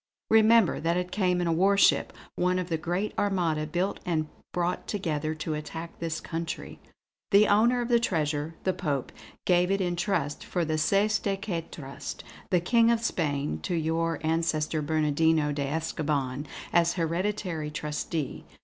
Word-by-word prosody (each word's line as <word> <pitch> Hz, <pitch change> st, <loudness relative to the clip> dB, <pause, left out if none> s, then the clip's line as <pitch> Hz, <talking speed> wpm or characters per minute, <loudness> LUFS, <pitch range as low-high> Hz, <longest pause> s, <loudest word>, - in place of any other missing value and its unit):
Remember, 225 Hz, -2 st, +5 dB
that 170 Hz, +2 st, +1 dB
it 180 Hz, 0 st, -2 dB
came 180 Hz, -3 st, +1 dB
in -, -, 0 dB
a 165 Hz, -, +2 dB
warship, 195 Hz, +4 st, +4 dB, 0.2 s
one 180 Hz, +1 st, +1 dB
of 180 Hz, -1 st, -3 dB
the 165 Hz, -, 0 dB
great 175 Hz, +6 st, -2 dB
Armada 170 Hz, -6 st, 0 dB
built 180 Hz, +5 st, -1 dB
and 155 Hz, -3 st, -1 dB, 0.2 s
brought 175 Hz, 0 st, -1 dB
together 155 Hz, -6 st, -2 dB
to 155 Hz, 0 st, -3 dB
attack 160 Hz, +2 st, -6 dB
this 165 Hz, -1 st, -2 dB
country. 165 Hz, 0 st, -5 dB, 0.5 s
The 205 Hz, +1 st, +6 dB
owner 235 Hz, +4 st, +4 dB
of 240 Hz, -, -2 dB
the 235 Hz, -1 st, +4 dB
treasure, 155 Hz, -6 st, -1 dB
the 185 Hz, -, +1 dB
Pope, 145 Hz, -8 st, -2 dB, 0.3 s
gave 180 Hz, 0 st, +3 dB
it 195 Hz, 0 st, +1 dB
in 175 Hz, -2 st, 0 dB
trust 170 Hz, -6 st, -1 dB
for 175 Hz, -2 st, -1 dB
the 155 Hz, 0 st, 0 dB
cestui 200 Hz, +4 st, +2 dB
que 185 Hz, -5 st, -2 dB
trust, 135 Hz, -3 st, -7 dB, 0.3 s
the 180 Hz, -3 st, +3 dB
King 230 Hz, +6 st, +4 dB
of 235 Hz, -1 st, +2 dB
Spain 145 Hz, -8 st, -1 dB
to 180 Hz, -, -2 dB
your 165 Hz, +1 st, 0 dB
ancestor 160 Hz, -1 st, 0 dB
Bernardino 155 Hz, 0 st, +2 dB
de 140 Hz, -1 st, -2 dB
Escoban, 145 Hz, -3 st, -2 dB, 0.3 s
as 170 Hz, -1 st, +4 dB
hereditary 170 Hz, -2 st, -2 dB
trustee. 150 Hz, 0 st, -3 dB
170 Hz, 160 wpm, -28 LUFS, 155-190 Hz, 0.5 s, The